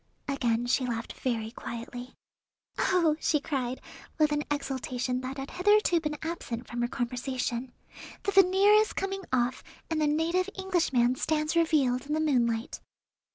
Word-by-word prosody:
Again 240 -4 0
she 255 +2 +2
laughed 235 -2 -3
very 225 -3 -2
quietly. 245 +2 -7 0.6
"Oh!" 335 -5 +3
she 305 - +2
cried, 260 -4 -3 0.4
with 305 -2 +3
an 295 0 0
exultation 255 -3 -2
that 260 +2 -5
had 270 0 -6
hitherto 405 -2 +3
been 300 -1 -3
absent 255 -8 -4
from 240 0 -4
her 240 - +1
conversation; 250 0 -3 0.5
"the 400 - 0
veneer 390 +1 +5
is 430 +1 +4
coming 390 0 -2
off, 250 0 0 0.3
and 315 -1 +1
the 300 - +3
native 335 +5 +1
Englishman 295 -10 +1
stands 305 +1 0
revealed 285 -6 +2
in 300 - -2
the - - 0
moonlight." 245 -4 0
275 Hz, 150 wpm, -29 LUFS, 245-325 Hz, 0.6 s, veneer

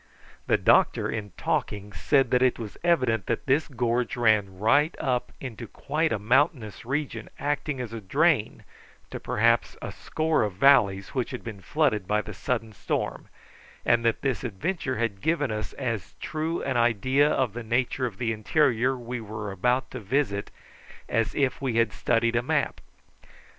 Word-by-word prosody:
The - - +4
doctor, - - +3
in 105 -2 -4
talking, 105 0 -2
said 135 - +2
that 125 - +3
it 130 -1 +3
was 110 -3 -7
evident 130 - +2
that 115 - -2
this 145 +3 +2
gorge 125 -2 -1
ran 105 -5 +2
right 140 - +3
up 125 -2 -1
into 120 -3 -7
quite 155 +7 -1
a 115 - +1
mountainous 120 - +1
region 130 -4 -3
acting 145 -1 -2
as 120 -3 -5
a 115 - -5
drain 140 - +1 0.5
to - - -5
perhaps 115 +2 +1
a - - -6
score 160 -2 0
of 105 -3 -1
valleys 100 -4 +4
which 130 -3 -2
had 130 - -6
been 110 -4 -7
flooded 110 - 0
by 105 0 +1
the - - -7
sudden 115 -4 -3
storm, - - -3 0.6
and 120 0 +3
that 115 -1 +1
this 135 -2 -1
adventure 130 - -2
had 110 -4 -2
given 155 -6 +1
us 110 -1 -4
as 115 -7 -4
true 160 +2 -3
an 130 -3 -1
idea 125 +5 +3
of 130 -8 0
the 120 - -5
nature 125 +3 0
of 105 -5 -9
the 115 0 -1
interior 130 +2 +2
we 120 0 -5
were 105 -1 -6
about 125 +7 0
to - - -5
visit 105 -2 -1 0.6
as 115 -1 0
if 135 -2 0
we 130 -4 -1
had 115 -3 +2
studied 115 0 +1
a 115 - +3
map. 120 - -1
120 Hz, 170 wpm, -26 LUFS, 110-135 Hz, 0.6 s, The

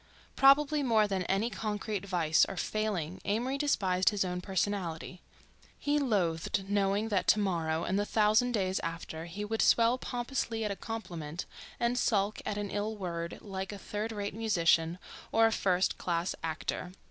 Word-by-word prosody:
Probably 290 +2 +5
more 225 -5 +3
than 195 -2 -1
any 200 +6 0
concrete 210 -1 -3
vice 165 -4 +3
or 195 - -6
failing 190 -6 -2
Amory 245 +7 -1
despised 190 -11 +2
his 205 -3 0
own 180 0 -3
personality—he 190 - -3
loathed 195 - 0
knowing 200 +2 +1
that 200 -3 0
to 215 - +5
morrow 165 -5 0
and 190 +2 0
the - - +2
thousand 220 +3 +3
days 190 -3 0
after 165 -1 -5
he 195 +5 -5
would 220 +1 -1
swell 235 +2 +4
pompously 240 -3 -2
at 210 - -1
a - - -2
compliment 175 -8 -5 0.3
and 240 +1 +1
sulk 205 -2 +1
at 205 - -2
an 205 -1 -3
ill 210 +2 -2
word 170 -4 -4
like 190 -1 -5
a 205 - -6
third 210 +3 -4
rate 205 -2 -4
musician 170 -6 +2 0.3
or 225 0 +5
a 225 - +4
first 185 -3 +1
class 170 0 -1
actor. 165 +2 -3
200 Hz, 160 wpm, -31 LUFS, 180-225 Hz, 0.3 s, Probably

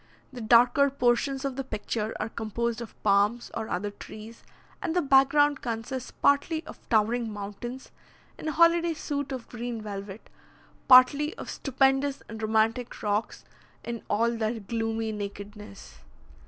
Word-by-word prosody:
The 245 - -7
darker 240 +5 +5
portions 265 +1 +1
of 270 -1 -3
the 270 - -2
picture 215 -2 -3
are 215 - -1
composed 230 +1 -3
of 235 - -9
palms 205 +3 +2
or 220 - -4
other 205 +3 -2
trees, 215 +2 -11 0.4
and 350 -4 -2
the 355 - +3
back 270 -1 +5
ground 290 0 +3
consists 245 +2 -4
partly 315 +3 +1
of - - -11
towering 225 +1 +2
mountains, 210 +5 -7 0.5
in - - -6
a - - +1
holiday 335 +1 +4
suit 285 -2 -4
of 255 -3 -5
green 240 -1 -5
velvet, 200 -1 -7 0.6
partly 280 +4 +6
of - - -6
stupendous 270 +1 +1
and 220 0 -8
romantic 220 +3 0
rocks 210 +1 -2 0.4
in 235 -1 -5
all 230 +3 +2
their 225 0 -2
gloomy 225 +1 -2
nakedness. 205 - -8
235 Hz, 145 wpm, -27 LUFS, 215-270 Hz, 0.6 s, partly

